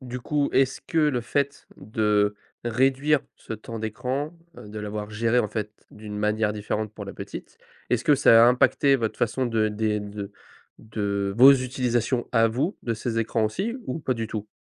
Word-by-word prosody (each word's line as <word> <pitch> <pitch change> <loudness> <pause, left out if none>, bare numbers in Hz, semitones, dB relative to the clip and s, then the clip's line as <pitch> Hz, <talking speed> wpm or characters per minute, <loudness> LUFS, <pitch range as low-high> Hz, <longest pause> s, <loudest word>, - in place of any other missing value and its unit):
du 125 -1 -6
coup 145 +2 0
est-ce 135 0 +2
que 160 +4 -3
le 150 -5 +2
fait 140 +4 -2
de 105 -1 +1 0.3
réduire 135 +5 +2 0.2
ce - - -9
temps 115 +1 -7
d'écran, 130 +7 -3 0.2
heu, 105 - -11
de 105 +1 -7
l'avoir 105 0 -5
géré 115 +3 +2
en 105 - -2
fait 105 0 -4 0.2
d'une 105 -1 -8
manière 105 0 +1
différente 105 0 -3
pour 100 - -7
la 100 - -7
petite? - - -9 0.3
Est-ce 125 -1 +1
que 150 - +5
ça 115 -4 +7
a 120 - +7
impacté 135 +2 +3
votre 115 -3 -3
façon 125 +2 0
de 110 -2 +1
des 105 0 -1
de 100 0 -7 0.5
de 100 -2 -2
vos 135 +3 +9
utilisations 125 -2 0
à 115 -2 +4
vous 130 - -1
de 115 - -1
ces 115 +1 -3
écrans 115 0 0
aussi 200 - -3
ou 130 - -3
pas 130 -4 -1
du 115 -1 -3
tout? 105 -1 -5
115 Hz, 190 wpm, -25 LUFS, 105-130 Hz, 0.5 s, vos